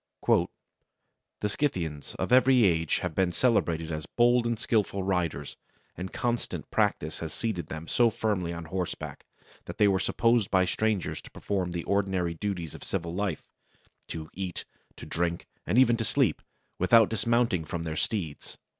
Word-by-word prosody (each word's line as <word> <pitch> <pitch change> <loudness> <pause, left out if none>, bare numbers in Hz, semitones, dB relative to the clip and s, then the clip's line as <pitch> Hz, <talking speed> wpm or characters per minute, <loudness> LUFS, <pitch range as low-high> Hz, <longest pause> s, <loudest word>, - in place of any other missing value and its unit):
"The - - +4 1.0
Scythians 85 - -2
of - - -3
every 130 -2 +6
age 80 -3 +2
have 90 -3 -2
been 95 +1 +2
celebrated 85 -8 +1
as 75 -1 -4
bold 120 0 +3
and 120 -1 0
skilful 105 -4 0
riders; 90 -6 -1 0.4
and 90 0 -6
constant 120 -1 -2
practice 75 +1 0
had 80 - -4
seated 90 -3 -3
them 80 +1 -7
so 120 -1 +4
firmly 105 -6 -1
on 85 -1 -6
horseback, 90 +2 -5 0.4
that - - -8
they 105 - +5
were 95 -1 +3
supposed 115 +1 +2
by 95 -1 +3
strangers 105 +1 -1
to - - -13
perform 95 -3 -2
the 85 -1 -3
ordinary 95 -4 0
duties 85 -2 -4
of - - -10
civil 85 0 -3
life 95 -3 -2 0.6
to 80 -1 -7
eat, 95 -2 -5 0.3
to - - -10
drink, 85 0 -2 0.2
and 110 - +1
even 120 -2 +6
to 115 - -1
sleep - - +1 0.4
without 110 +4 +6
dismounting 115 -4 +1
from 85 +2 -4
their 80 -1 -3
steeds." 80 -4 -3
95 Hz, 160 wpm, -28 LUFS, 85-110 Hz, 1.0 s, every